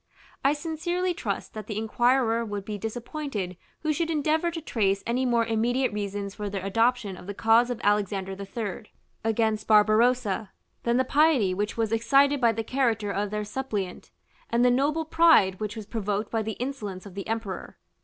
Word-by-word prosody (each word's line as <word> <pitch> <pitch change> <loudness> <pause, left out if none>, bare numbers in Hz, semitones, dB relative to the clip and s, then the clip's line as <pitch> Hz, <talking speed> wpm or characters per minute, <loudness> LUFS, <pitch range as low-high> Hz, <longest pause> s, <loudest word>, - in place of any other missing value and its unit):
I 275 +2 +4
sincerely 345 +4 -2
trust 210 - -4
that 215 -1 -7
the 210 - -4
inquirer 235 +1 +2
would 205 -3 -5
be 210 -1 -5
disappointed 225 - -4 0.3
who 310 -1 +1
should 330 +1 -1
endeavor 315 +2 +1
to 335 -1 -5
trace 200 -10 0
any 250 +3 0
more 235 -1 +2
immediate 235 +3 +1
reasons 200 -1 -3
for 210 -1 -4
their 195 -1 -4
adoption 225 0 +1
of 180 0 -12
the 205 - -5
cause 225 +3 +4
of 245 -2 -3
Alexander 200 -2 +1
III. 200 +2 -6 0.3
against 220 -1 0
Barbarossa, 215 0 +3 0.3
than 235 0 +1
the 260 - +3
piety 280 - +3
which 205 +4 -2
was 225 -1 0
excited 275 +5 +3
by 235 -1 +5
the 225 0 -3
character 225 -5 0
of 205 +1 -1
their 210 0 -3
suppliant, 210 -6 -4 0.4
and 235 +1 +3
the 250 - +5
noble 295 +5 +1
pride 315 - +5
which 215 0 -4
was 220 -2 -7
provoked 205 -1 -2
by 225 - 0
the 220 0 -3
insolence 210 -7 -5
of 200 - -10
the 195 +1 -6
emperor. 220 -4 -4
225 Hz, 180 wpm, -26 LUFS, 205-255 Hz, 0.4 s, by